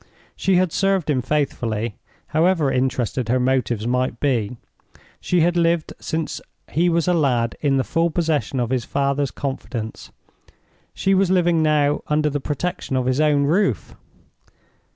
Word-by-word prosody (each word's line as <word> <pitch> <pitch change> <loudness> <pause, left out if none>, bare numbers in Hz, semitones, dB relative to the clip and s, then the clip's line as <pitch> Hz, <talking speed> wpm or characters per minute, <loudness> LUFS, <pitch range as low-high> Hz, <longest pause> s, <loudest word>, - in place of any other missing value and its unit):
She 195 - +1
had 180 -1 +2
served 195 -5 +1
him 130 -3 +1
faithfully, 120 -6 -1 0.4
however 160 -2 +2
interested 125 -2 -1
her 130 +2 +2
motives 125 -4 0
might 125 -1 -1
be—she 125 - -3
had 175 +2 +2
lived 170 -2 +1
since 160 -1 -3 0.3
he 175 +3 +2
was 170 0 +1
a 180 - +3
lad 125 -8 +1
in 140 -2 +2
the 130 - +2
full 165 +4 +1
possession 155 -5 -1
of 120 0 -1
his 130 -3 0
father's 140 +1 0
confidence—she 130 - -6
was 190 -1 +3
living 175 -3 +3
now 150 -2 +2
under 150 0 +1
the 145 - -1
protection 145 0 -3
of 130 -1 0
his 130 +3 +1
own 150 -2 +3
roof. 155 - 0
145 Hz, 145 wpm, -21 LUFS, 130-165 Hz, 0.4 s, a